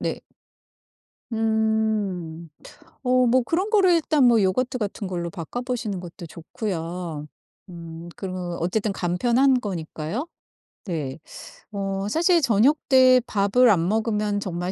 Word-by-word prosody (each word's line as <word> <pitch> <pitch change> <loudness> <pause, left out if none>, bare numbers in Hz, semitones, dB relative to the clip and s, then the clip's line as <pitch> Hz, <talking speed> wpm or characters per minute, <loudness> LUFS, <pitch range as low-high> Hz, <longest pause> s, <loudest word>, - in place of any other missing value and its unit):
네. - - -3 1.1
음. 220 -7 -1 0.5
어 255 0 +3
뭐 250 +2 +4
그런 355 - -1
거를 390 -4 +5
일단 305 -6 +3
요구르트 235 +4 +2
같은 205 -3 -4
걸로 175 -2 -3
바꿔보시는 225 - -4
것도 175 -1 -9
좋고요. 165 -2 -5 0.4
음 170 -1 -9
그리고 180 -2 -5
어쨌든 205 +5 0
간편한 240 +9 +2
거니까요. 185 - -4 0.6
네. 155 -7 -4 0.5
어 195 -1 -3
사실 340 - +3
저녁때 255 +1 +4
밥을 215 +4 +3
안 170 -5 +3
먹으면 210 -1 0
정말 180 -2 -3
205 Hz, 230 characters per minute, -24 LUFS, 175-250 Hz, 1.1 s, 거를